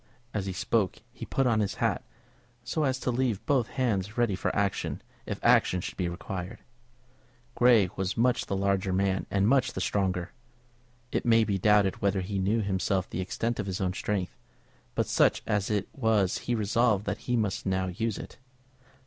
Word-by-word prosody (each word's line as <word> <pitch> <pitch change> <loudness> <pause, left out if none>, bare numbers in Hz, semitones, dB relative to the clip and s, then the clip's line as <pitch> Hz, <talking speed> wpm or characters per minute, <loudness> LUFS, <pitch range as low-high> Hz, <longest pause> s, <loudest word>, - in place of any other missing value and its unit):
As 100 -2 -2
he - - -1
spoke 95 +2 0 0.2
he - - -8
put 135 - +1
on 115 -3 +3
his 105 -2 -1
hat, - - 0 0.6
so 150 +5 -1
as 130 -1 +1
to 125 - 0
leave 120 -4 -1
both 135 -7 +2
his - - -16
hands 105 -5 -1
ready 120 -4 +2
for 90 - -2
action 100 -1 -1 0.3
if - - -4
action 90 - +4
should - - -6
be 90 -2 -1
required. 90 +4 -6 1.0
Grey 120 -6 +5
was 95 +1 -2
much 125 +1 +2
the 100 - -1
larger 100 0 0
man 95 0 0
and 100 +1 +2
much 130 +1 +3
the - - -4
stronger. 90 -3 -1 0.8
It - - 0
may 115 -1 +5
be 100 -2 -1
doubted 105 -1 +3
whether 100 -1 +1
he 95 +1 -3
knew 105 +4 +1
himself 95 -1 -1
the 90 - -2
extent 115 +5 -2
of 105 - -2
his 95 -1 -3
own 90 -1 0
strength, 95 -2 -2 0.6
but - - +1
such - - +2
as 105 -3 0
it 105 -2 0
was 110 -7 +1
he 120 - +3
resolved 110 -1 +2
that 105 +2 -2
he 125 - +3
must 105 -4 -1
now 95 0 +1
use 105 +4 -2
it. - - -10
100 Hz, 190 wpm, -28 LUFS, 95-115 Hz, 1.0 s, Grey